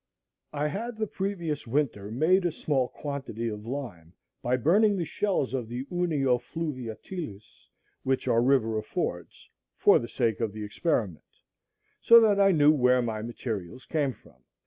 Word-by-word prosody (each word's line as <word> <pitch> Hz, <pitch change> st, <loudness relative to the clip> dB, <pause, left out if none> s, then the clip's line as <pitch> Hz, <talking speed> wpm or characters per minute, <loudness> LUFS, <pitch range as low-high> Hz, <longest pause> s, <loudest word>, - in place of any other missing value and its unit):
I 150 Hz, 0 st, -1 dB
had 225 Hz, +6 st, -5 dB
the 220 Hz, -, 0 dB
previous 180 Hz, -, -3 dB
winter 115 Hz, -6 st, -1 dB
made 160 Hz, -, +3 dB
a 175 Hz, -, +1 dB
small 140 Hz, -5 st, 0 dB
quantity 135 Hz, -6 st, -5 dB
of 105 Hz, 0 st, -7 dB
lime 110 Hz, -, -6 dB, 0.3 s
by 125 Hz, +1 st, +1 dB
burning 200 Hz, -, +3 dB
the 170 Hz, -, -1 dB
shells 180 Hz, -8 st, -1 dB
of 125 Hz, -4 st, -2 dB
the 120 Hz, +3 st, -5 dB
Unio 150 Hz, -8 st, +1 dB
fluviatilis, 130 Hz, -, -7 dB, 0.3 s
which 130 Hz, 0 st, -1 dB
our 115 Hz, -, +3 dB
river 120 Hz, -4 st, +2 dB
affords, -, -, -4 dB, 0.3 s
for -, -, +5 dB
the 120 Hz, -, -5 dB
sake 115 Hz, -2 st, 0 dB
of 115 Hz, -4 st, -2 dB
the 110 Hz, 0 st, -6 dB
experiment; 105 Hz, -, -2 dB, 0.7 s
so 235 Hz, 0 st, +8 dB
that 210 Hz, -3 st, +3 dB
I 195 Hz, 0 st, +6 dB
knew 150 Hz, -3 st, +5 dB
where 125 Hz, -3 st, +3 dB
my 110 Hz, -2 st, -3 dB
materials 115 Hz, -1 st, -5 dB
came 145 Hz, -5 st, 0 dB
from. -, -, -22 dB
135 Hz, 155 wpm, -27 LUFS, 115-165 Hz, 0.7 s, so